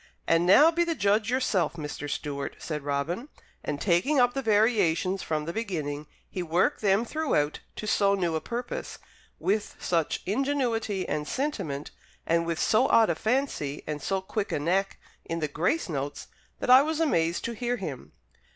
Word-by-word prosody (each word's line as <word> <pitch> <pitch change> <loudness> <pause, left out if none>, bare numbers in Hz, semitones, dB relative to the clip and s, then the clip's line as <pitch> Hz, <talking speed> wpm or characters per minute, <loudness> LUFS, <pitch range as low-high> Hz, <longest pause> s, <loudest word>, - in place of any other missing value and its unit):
"And 165 +1 +3
now 300 - +7
be 340 +1 +2
the 335 -1 -1
judge 205 0 +2
yourself, 230 - +1
Mr. 150 -2 -5
Stewart," 140 -1 -4
said 150 -2 -4
Robin; 145 - -2 0.3
and 145 - -3
taking 200 - +2
up 245 0 +4
the 270 - -2
variations 205 -5 +2
from 155 -1 -2
the 170 - -4
beginning, 155 -9 -3 0.2
he 185 - -5
worked 175 - +1
them 200 +2 +3
throughout 235 - 0 0.2
to - - -6
so 200 -1 +3
new 175 -4 0
a 160 - -1
purpose, 240 +1 -5 0.4
with 210 +1 -1
such 165 -3 -1
ingenuity 230 -4 0
and 150 0 -2
sentiment, 190 - -3 0.3
and 170 0 +1
with 170 -1 -1
so 245 +5 +3
odd 225 -5 +5
a - - -1
fancy 220 - -1
and 150 -1 -4
so 195 +4 -1
quick 200 +2 -3
a - - 0
knack 185 +6 0 0.2
in 165 - -4
the 155 - 0
grace 175 - 0
notes, 145 -3 -4 0.3
that - - +2
I 260 +1 +10
was 310 +2 -1
amazed 170 - +1
to 235 - -2
hear 245 +2 -2
him. 150 - -7
190 Hz, 175 wpm, -27 LUFS, 160-240 Hz, 0.4 s, I